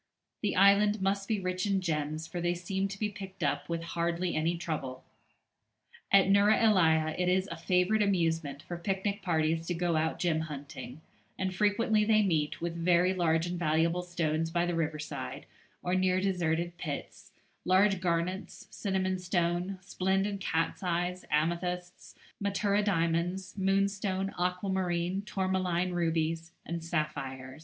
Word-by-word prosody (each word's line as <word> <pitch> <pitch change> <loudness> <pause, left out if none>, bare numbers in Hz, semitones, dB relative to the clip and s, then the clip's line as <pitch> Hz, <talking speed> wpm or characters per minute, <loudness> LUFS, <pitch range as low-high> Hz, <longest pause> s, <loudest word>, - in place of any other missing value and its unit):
The 210 - 0
island 200 +2 +5
must 195 +1 0
be 215 -2 0
rich 185 +1 -2
in 195 -1 +2
gems, 155 -2 -2
for 175 +1 -5
they 175 0 +1
seem 190 +3 -2
to 195 0 -7
be 210 - 0
picked 195 -3 -8
up 145 +1 -1
with 165 0 -2
hardly 170 +1 -1
any 165 +2 +1
trouble. 145 -6 -4 1.1
At 195 -1 +6
Neuera 200 +2 +5
ellia 160 -8 +4
it 180 0 +2
is 185 +1 +2
a - - -3
favourite 185 +4 +2
amusement 165 -7 0
for 175 - -6
picnic 195 +3 -2
parties 165 -1 0
to 175 - -1
go 170 -1 0
out 160 +1 0
gem 170 -3 +1
hunting, 145 -2 -7 0.4
and 190 0 -1
frequently 210 +2 +2
they 215 0 +4
meet 155 -6 0
with 170 0 -3
very 175 +2 +3
large 165 -3 +2
and 175 0 -3
valuable 165 +2 +2
stones 165 -2 -1
by 170 +1 +1
the 175 - -1
riverside 155 -2 -3 0.4
or 180 - -1
near 185 0 +2
deserted 175 -3 0
pits, 150 -5 -6 0.3
large 190 +1 +3
garnets, 180 +2 -2
cinnamon 190 -2 -1
stone, 175 +1 0
splendid 195 +2 0
cat's 165 -3 -1
eyes, 180 0 -1
amethysts, 175 +3 -2 0.3
matura 200 +1 +1
diamonds, 180 0 0
moonstone, 195 0 0
aquamarine, 180 0 0
tourmaline 185 -2 0
rubies, 165 -1 -1
and 170 -1 -4
sapphires. 135 -5 -3
180 Hz, 145 wpm, -30 LUFS, 165-190 Hz, 1.1 s, At